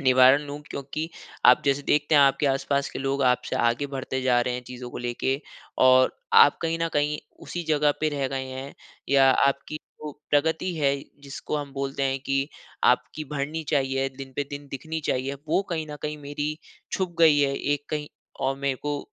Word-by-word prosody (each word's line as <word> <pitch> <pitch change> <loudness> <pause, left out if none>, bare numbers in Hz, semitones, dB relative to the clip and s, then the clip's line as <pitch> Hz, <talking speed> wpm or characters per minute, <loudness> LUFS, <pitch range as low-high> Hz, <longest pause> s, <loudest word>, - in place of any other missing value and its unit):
निवारण 130 +1 +6
लूँ 145 +1 -6
क्योंकि 140 +4 -4 0.4
आप 125 +1 +7
जैसे 140 0 +1
देखते 150 +2 +2
हैं 145 - +8
आपके 140 +1 +3
आस-पास 140 +1 0
के - - -6
लोग 135 +1 -1
आपसे 125 0 +1
आगे 120 +4 +1
बढ़ते 130 -1 -4
जा 125 -2 +3
रहे 125 0 -1
हैं 125 - -4
चीज़ों 125 -1 -8
को - - -6
लेके 120 +3 -1 0.4
और 130 0 +5 0.2
आप 455 0 +7
कहीं 165 0 0
न 165 - +1
कहीं 150 0 +1 0.2
उसी 175 - -5
जगह 150 -1 +3
पे 155 - +2
रह 135 -1 0
गए 135 0 -3
हैं 130 +1 -7 0.3
या 135 -1 +6
आपकी 140 +3 +1 0.3
जो 150 - -4 0.2
प्रगति 160 +5 +1
है, 140 -2 +2 0.3
जिसको 140 +2 -5
हम 145 -2 -5
बोलते 140 0 -3
हैं 135 0 +1
कि 135 +1 0 0.4
आपकी 125 +5 +2
बढ़नी 150 +3 -2
चाहिए 135 -1 +1
दिन 135 -1 -8
पे 145 - 0
दिन 145 0 -7
दिखनी 160 +4 -4
चाहिए, 130 +2 -1
वो 175 - +2
कहीं 160 -2 -2
न 150 - -6
कहीं 150 0 -3
मेरी 145 +1 -4 0.3
छुप 185 -2 -2
गई 160 -3 +6
है 140 -1 +2
एक 145 0 -1
कहीं 150 -1 -3 0.4
और 135 0 +1
मेरे 140 -1 -1
को 145 0 -1
140 Hz, 195 wpm, -25 LUFS, 135-150 Hz, 0.4 s, हैं